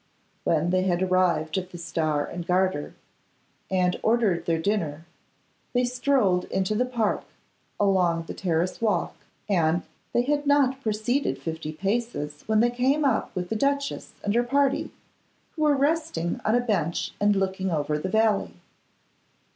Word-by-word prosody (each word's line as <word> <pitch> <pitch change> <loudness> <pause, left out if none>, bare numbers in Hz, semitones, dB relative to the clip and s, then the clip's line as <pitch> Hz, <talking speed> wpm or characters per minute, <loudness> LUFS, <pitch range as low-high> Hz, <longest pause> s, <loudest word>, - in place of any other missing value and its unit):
When 165 +1 +2
they 185 0 +3
had 185 -1 +1
arrived 180 -3 +2
at 185 -1 -8
the 175 - -9
Star 160 -3 -1
and 175 0 -6
Garter, 185 -4 0 0.7
and 180 -1 +1
ordered 220 -6 +1
their 165 -1 +2
dinner, 160 -4 -1 0.7
they 245 0 +2
strolled 245 -7 +2
into 190 +2 -1
the 250 +4 +1
Park, 235 -4 0 0.6
along 180 -4 +2
the - - -7
Terrace 175 +1 -1
walk; 205 -7 +1 0.3
and 170 -3 +2 0.3
they 240 - +2
had 290 +2 0
not 275 -2 +3
proceeded 230 +4 0
fifty 160 -1 -5
paces 195 -5 -2
when 220 0 +3
they 240 +1 +3
came 265 +5 +1
up 255 -5 +1
with 180 -1 -3
the - - -1
duchess 280 +3 -1
and 205 - 0
her 240 - +4
party, 275 +2 +1 0.6
who 315 - -7
were 300 -2 +4
resting 285 - 0
on 215 - +2
a 245 - +3
bench 180 -9 -1
and 205 0 +4
looking 190 0 -1
over 150 -2 -1
the 185 - -3
valley. 210 - +1
195 Hz, 155 wpm, -26 LUFS, 170-240 Hz, 0.7 s, her